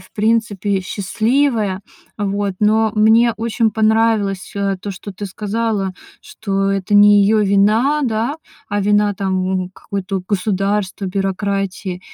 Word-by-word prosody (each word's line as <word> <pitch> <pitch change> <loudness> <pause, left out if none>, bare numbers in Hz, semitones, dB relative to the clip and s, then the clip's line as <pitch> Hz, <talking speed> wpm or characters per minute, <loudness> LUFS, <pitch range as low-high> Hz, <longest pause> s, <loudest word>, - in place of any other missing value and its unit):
в 185 0 -18
принципе, 210 -3 0
счастливая, 215 +1 0 0.4
вот. 200 -1 -1
Но 220 +1 +3
мне 225 +2 +4
очень 225 0 0
понравилось, 220 -3 +1
э, 195 -1 0
то, 205 - -5
что 195 +1 -8
ты 205 - -6
сказала, 210 0 -2 0.3
что 195 -2 -2
это 195 +1 -1
не 205 0 +7
её 215 +2 +3
вина, 215 +9 +2
да. 235 +5 -1 0.3
А 205 0 -1
вина, 205 0 +2
там, 190 -1 -1 0.2
м, 180 - -8
какое-то, 195 -1 -4
вот, 185 - -5
государство, 200 0 -1
бюрократия. 195 -1 -2
205 Hz, 135 wpm, -18 LUFS, 195-220 Hz, 0.4 s, не